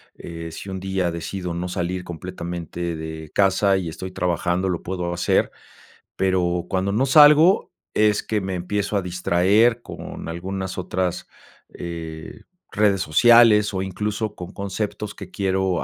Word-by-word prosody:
eh, 85 -1 -8
si 95 - -8
un 95 0 -4
día 95 -2 -1
decido 90 +1 -4
no 90 +1 -3
salir, 90 0 -3
completamente 85 -1 -5
de 80 0 -7
casa, 95 0 +3
y 90 -3 -3
estoy 95 +3 -6
trabajando, 90 0 0
lo 90 -3 -2
puedo 90 -1 -3
hacer. 85 0 +1 0.6
Pero 90 -2 0
cuando 95 +1 -1
no 115 +7 +2
salgo, 150 +6 +6 0.2
es 105 -1 +2
que 110 -2 -1
me 95 -1 -3
empiezo 100 +3 -2
a 95 - -1
distraer, 95 +6 +2
con - - -8
algunas 95 +3 -4
otras, 90 -1 -2 0.5
eh, 80 -2 -7 0.3
redes 100 -2 +2
sociales. 105 +4 +5
O 95 - -1
incluso, 105 +3 -3
con 90 +2 -8
conceptos 105 +1 -4
que 95 - -10
quiero 95 -2 0
95 Hz, 145 wpm, -22 LUFS, 85-100 Hz, 0.6 s, salgo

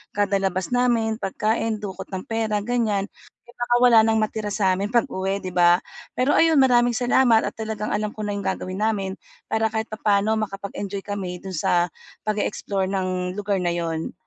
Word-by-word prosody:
kada 200 -1 +1
labas 190 0 -1
namin, 230 -3 +1
pagkain, 220 +3 -1
dukot 190 -2 -6
ng 190 -1 -4
pera, 220 -2 0
ganyan. 215 -4 0 0.4
Eh, 240 - -17
baka 240 0 +1
wala 240 -2 +7
ng 220 0 +3
matira 215 0 -3
sa'min 195 -1 +1
pag-uwi, 195 -4 0
'di 185 - -4
ba. 175 0 +5 0.4
Pero 255 +3 +2
ayun, 325 -1 +5
maraming 245 -2 +4
salamat 245 -1 +4
at - - -3
talagang 220 -1 -4
alam 210 0 -1
ko 215 - -5
na 205 - -2
yung - - -3
gagawin 185 +1 -3
namin 195 -3 -1 0.3
para 220 0 +2
kahit 220 0 -2
papaano, 215 0 +1
makapag-enjoy 200 -1 -5
kami 190 -3 -4
do'n 190 - -6
sa 175 +2 +1 0.3
pag-e-explore 205 -2 -1
ng 185 -1 -2
lugar 200 -1 -1
na 175 -1 0
'yon. 165 -1 -3
205 Hz, 170 wpm, -23 LUFS, 190-225 Hz, 0.4 s, wala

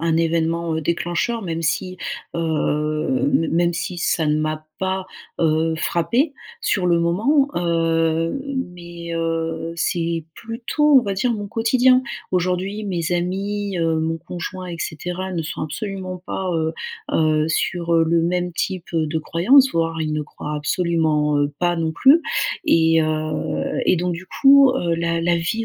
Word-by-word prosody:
un 160 - +2
événement, 165 0 0
heu, - - -1
déclencheur 175 +8 -1
même 165 -2 -3
si, 185 +3 -1 0.4
heu, 160 - 0 0.2
même 170 +1 +2
si 175 +1 -4
ça 165 -1 +1
ne 150 - +2
m'a 155 0 -2
pas, 190 0 -2 0.3
heu, 160 0 +2
frappée 240 - 0 0.3
sur 185 -3 0
le 170 -1 +3
moment, 235 - +2
heu, 165 +1 +1 0.4
mais, 170 -1 -8
heu, 165 0 -2
c'est 165 -1 -1
plutôt 250 +5 +2
on - - +2
va 200 -3 -2
dire 235 +6 +1
mon 205 -2 -4
quotidien. 255 +3 +3 0.3
Aujourd'hui 185 +3 -1
mes 175 -4 -2
amis, 195 +2 -2
heu, 165 -1 +1
mon 165 +1 -1
conjoint 180 +2 -6
et 175 -1 -5
cetera 180 +4 -4
ne 170 -2 -2
sont 155 - -5
absolument 185 +3 -5
pas, 190 -1 -3
heu, 160 0 -1 0.4
heu 155 0 +2
sur, 170 +1 0
heu, 165 0 +5
le 165 0 +3
même 180 +1 0
type, 185 +1 -2
heu, 160 -2 +1
de 160 +1 -1
croyance. 255 - +4
Voire 165 0 0
ils 155 -1 -2
ne 150 - -1
croient 150 0 -7
absolument, 155 -3 +1
heu, 145 0 +1
pas 175 -1 +2
non 165 -1 -1
plus. 275 - +5 0.5
Et, 165 0 +4
heu, 155 0 -2
et - - +4
donc 175 +1 -1
du 175 +2 -7
coup, 275 -1 +6
heu, 170 -6 0
la 170 0 0
la 175 0 +2
vie 170 +7 -1
170 Hz, 160 wpm, -21 LUFS, 165-190 Hz, 0.5 s, coup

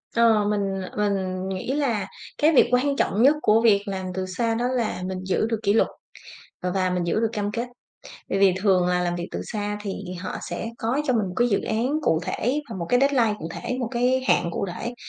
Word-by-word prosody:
Ờ, 225 -3 +4
mình 195 -2 -1 0.2
mình 190 -2 -1
nghĩ 190 +6 -3
là 240 -9 0 0.3
cái 305 +2 +4
việc - - +6
quan 270 +3 +2
trọng 215 -5 +1
nhất 290 +3 +6
của 220 -2 +4
việc 205 -3 +4
làm 190 -1 -3
từ 190 0 -2
xa 225 +5 -1
đó 240 +2 -1
là 245 -7 -1
mình 185 0 -3
giữ 190 +3 0
được 225 -2 -1
kỷ 200 0 +3
luật, 225 - +4 0.7
ờ, 180 - -1
và 185 -1 +1
mình 180 -1 -1
giữ 170 - 0
được 225 0 +1
cam 205 -2 -2
kết. 235 +2 -3 0.6
Bởi 195 - 0
vì 195 -2 +5
thường 185 -3 +4
là 180 0 +2
làm 175 0 -1
việc 175 0 -4
từ - - -4
xa 205 -2 -3
thì 200 -2 -4 0.3
họ 185 - -5
sẽ 225 - -4
có 240 +6 -1
cho 255 - +3
mình 220 -4 +1
một 180 - -6
cái 240 0 +4
dự 200 - +1
án 225 +3 -1
cụ 160 - +2
thể 250 +10 -1
và - - -6
một 170 - -3
cái 245 - +4
deadline 260 -6 +3
cụ 165 - -6
thể, 250 - -4
một 245 - -1
cái 255 +1 +1
hạn 170 - +3
cụ 170 - -2
thể. 235 +5 -5
210 Hz, 240 wpm, -24 LUFS, 190-240 Hz, 0.7 s, việc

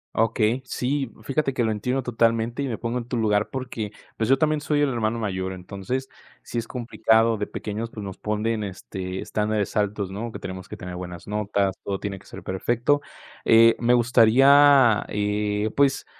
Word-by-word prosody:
Okey, 115 +2 +2
sí, 130 0 -2
fíjate 135 +1 -1
que, 120 - +1
lo 110 - +1
entiendo 125 +5 -1
totalmente 115 +1 +1
y 140 - -1
me 115 - -3
pongo 120 +1 -2
en 120 - -8
tu 125 -1 -2
lugar, 105 -2 +1
porque, 125 -5 -5 0.2
pues, 110 +2 -1
yo 135 - +5
también 155 0 +1
soy 150 -1 +1
el 145 - +3
hermano 115 -2 -1
mayor, 95 -3 -3
entonces, 100 +8 -5 0.4
si 120 - -3
es 115 - -5
complicado 115 -2 +2
de 105 - -3
pequeños, 110 +2 -5
pues, 105 -2 -8
nos 95 -2 -7
ponen, 110 +1 -1
este, 95 -1 -6
estándares 105 -1 -1
altos, 105 -2 -1
¿no?, 110 +4 -5
que - - -7
tenemos 95 0 -7
que 105 - -7
tener 90 -2 -7
buenas 90 -1 -7
notas, 100 -2 -1
todo 100 -1 -3
tiene 100 -2 -5
que - - -20
ser - - -10
perfecto. 120 +9 0 0.4
Eh, 115 0 +6
me 120 +1 +4
gustaría, 125 +1 +6
eh, 105 +1 -1
pues, 140 -1 +2
110 Hz, 185 wpm, -24 LUFS, 105-125 Hz, 0.4 s, Eh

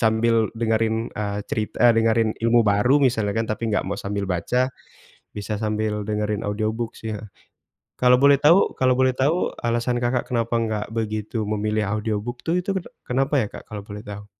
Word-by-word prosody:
sambil 115 +1 +2 0.2
dengerin, 110 -1 +1 0.2
eee, 100 -1 -3
cerit 105 -1 -2
eee, 120 0 +6
dengerin 115 0 +3
ilmu 115 +1 +4
baru 105 +6 +3
misalnya 110 -5 0
kan, 115 - 0
tapi 110 - -3
enggak 105 - 0
mau 100 - -2
sambil 100 0 -2
baca, 90 +7 -1 0.8
bisa 105 +1 -4
sambil 110 0 -1
dengerin 105 0 -2
audiobook 110 +2 -2
sih 110 - -6
ya. 110 - -9 0.8
Kalau 125 0 +6
boleh 140 0 +7
tahu 160 +5 +7 0.2
kalau 130 -1 +4
boleh 130 0 +3
tahu 145 +7 +1 0.2
alasan, 120 +1 0
Kakak, 120 0 0
kenapa 115 -1 0
nggak 110 -2 -1
begitu 110 0 -2
memilih 105 0 0
audiobook 110 +3 -2
tuh, 165 - +2
itu 180 - -5
kene 190 - -3 0.2
kenapa 135 +3 0
ya, 105 - -1
Kak, - - -9
kalau 105 -2 -6
boleh 105 0 -8
tahu? 105 -1 -9
110 Hz, 180 wpm, -23 LUFS, 105-120 Hz, 0.8 s, boleh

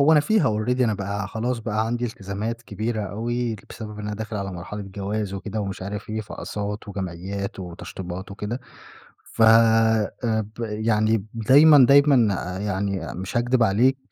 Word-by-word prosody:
هو 150 +3 +6
أنا 150 - +6
فيها 215 +3 +2 0.2
Already 125 +2 0
أنا 110 -3 +2
بقى 100 0 -3
خلاص 115 +4 -2
بقى 110 0 -1
عندي 120 +1 -1
التزامات 110 +2 -4
كبيرة 110 +2 -3
أوي، 115 +3 -2
بسبب 105 -2 -8
إن 105 - -5
أنا 105 - -3
داخل 110 0 -5
على 100 -1 -4
مرحلة 95 +4 -6
جواز 100 +1 -4
وكده 105 +2 -4
ومش 95 -2 -4
عارف 105 +2 -6
إيه، 110 - -2
فأقساط 105 0 -5
وجمعيّات 95 0 -5
وتشطيبات 90 +1 -7
وكدة، 105 +5 -4 0.6
ف - - -2
آآ، 110 -1 +5 0.4
ب - - -6
يعني 110 -1 +1
دايمًا، 135 +4 +7
دايمًا 140 -7 +5 0.3
يعني 100 -3 -2
مش 95 +5 -5
هاكدب 120 0 +2
عليك، 120 +6 +3
105 Hz, 155 wpm, -24 LUFS, 100-115 Hz, 0.6 s, دايمًا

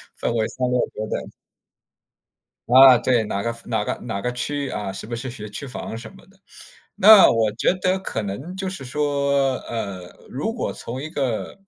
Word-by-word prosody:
分 - - -2
为 110 -1 +1
3-6-9 125 -4 -2
等。 - - -4 1.4
啊， 130 0 +9
对， 120 -2 +1
哪 100 -1 -3
个 115 0 0
夫 115 - -1
哪 - - 0
个 - - -2
哪 100 - -4
个 125 - -2
区 145 +3 -1
域 135 - -4
啊， 95 -2 -4
是 95 - -4
不 120 - -5
是 130 +3 -5
学 110 -3 -6
区 105 +7 -2
房 125 - -6
什 115 -1 -8
么 - - -17
的。 190 +1 -25 0.6
那 210 0 +8
我 110 -2 +2
觉 120 - +1
得 185 +1 0
可 115 - -3
能， 105 - -6
就 190 0 -2
是 185 -7 -4
说， 140 -1 0
呃， 100 -6 -5 0.2
如 - - -3
果 - - -3
从 130 +4 -6
一 155 - -6
个， 135 - -3
125 Hz, 200 characters per minute, -22 LUFS, 110-145 Hz, 1.4 s, 啊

